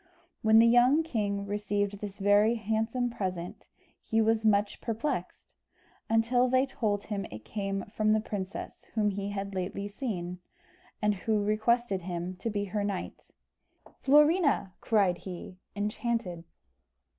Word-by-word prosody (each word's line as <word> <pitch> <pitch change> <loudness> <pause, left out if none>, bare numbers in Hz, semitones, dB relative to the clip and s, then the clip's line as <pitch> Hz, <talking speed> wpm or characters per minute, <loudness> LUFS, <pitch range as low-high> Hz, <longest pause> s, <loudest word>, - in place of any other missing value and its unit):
When 220 0 +5
the 225 - +8
young 245 +6 +5
king 205 -9 -2
received 205 0 -1
this 205 -1 -6
very 205 +3 +4
handsome 225 +3 -1
present, 185 -5 -5 0.3
he 225 - 0
was 225 0 +2
much 205 -1 +2
perplexed, 230 +6 -3 0.6
until 230 +3 +3
they 260 +1 +3
told 210 -6 -1
him 200 -2 -3
it 110 0 -10
came 195 -2 -3
from 215 0 +2
the 215 - +4
princess 200 -2 -6
whom 210 -2 +2
he 200 +1 -3
had 200 0 -4
lately 195 +2 -3
seen, 185 -6 -4 0.6
and 210 0 +3
who 210 +2 0
requested 215 -1 +1
him 175 +1 -4
to 230 - -3
be 205 -1 -2
her 205 +1 -2
knight. 200 -2 -5 0.7
"Florina!" 295 - +4
cried 195 -5 +2
he, 180 0 -8 0.2
enchanted. 210 -4 -2
210 Hz, 135 wpm, -29 LUFS, 195-225 Hz, 0.7 s, the